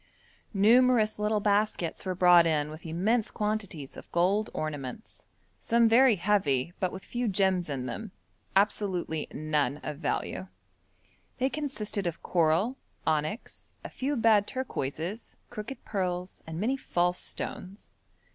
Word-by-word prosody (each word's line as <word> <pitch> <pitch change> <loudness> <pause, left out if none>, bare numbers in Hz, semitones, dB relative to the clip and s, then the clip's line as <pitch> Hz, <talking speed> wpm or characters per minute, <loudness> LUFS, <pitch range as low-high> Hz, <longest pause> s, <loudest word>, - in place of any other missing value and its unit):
Numerous 225 +1 +4
little 210 0 +1
baskets 205 -4 0
were 185 - -1
brought 175 -2 +6
in 150 -2 0
with 155 +2 -9
immense 210 +8 +1
quantities 210 -9 -3
of - - -12
gold 195 +5 +2
ornaments, 150 - -6 0.3
some 235 0 +3
very 240 +1 +6
heavy, 175 -7 +1
but 185 - 0
with 190 - -9
few 245 0 -2
gems 190 -4 +1
in 135 -3 -3
them 210 - -5 0.5
absolutely 190 -5 +1
none 150 -1 0
of 150 -2 -4
value. 95 - -2 0.9
They 260 +1 +1
consisted 215 -9 -3
of 170 -1 -5
coral, 175 +9 +2 0.3
onyx, 155 +8 -2
a - - -6
few 280 +3 -2
bad 220 -4 +4
turquoises, 200 - -4
crooked 215 +6 -7
pearls, 180 -2 -3
and 160 0 -5
many 250 +7 +1
false 180 -7 0
stones. 190 +3 -5
190 Hz, 130 wpm, -29 LUFS, 160-220 Hz, 0.9 s, brought